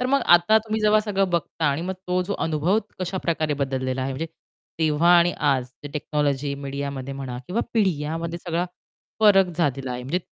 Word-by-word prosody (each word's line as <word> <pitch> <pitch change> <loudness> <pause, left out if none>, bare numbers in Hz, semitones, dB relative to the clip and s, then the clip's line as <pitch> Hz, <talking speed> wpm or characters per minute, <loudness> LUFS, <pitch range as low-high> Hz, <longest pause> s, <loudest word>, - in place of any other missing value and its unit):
तर 250 - +1
मग 275 +2 +3
आता 175 +6 +5
तुम्ही 220 0 -3
जेव्हा 215 0 +4
सगळं 195 -3 0
बघता 170 -1 -2
आणि 145 +3 0
मग 190 +1 -3
तो 180 0 +1
जो 200 +3 -3
अनुभव 165 +6 +1 0.2
कशा 185 +1 -3
प्रकारे 155 -3 0
बदललेला 130 -1 -1
आहे 135 +1 -2
म्हणजे 160 +5 -3 0.5
तेव्हा 160 +1 +2
आणि 175 +1 +3
आज 140 -4 +2 0.2
जे - - -4
टेक्नॉलॉजी 145 -2 -1
मीडियामध्ये 140 -1 -4
म्हणा 130 -3 -5
किंवा 215 +6 -1
पिढी 195 -7 +3
या 155 +2 -2
मध्ये 170 +1 -4
सगळा 175 0 -2 0.6
फरक 200 -3 +6
झालेला 135 -6 0
आहे. 125 0 -5
म्हणजे 140 +8 -1
165 Hz, 190 wpm, -24 LUFS, 140-185 Hz, 0.6 s, फरक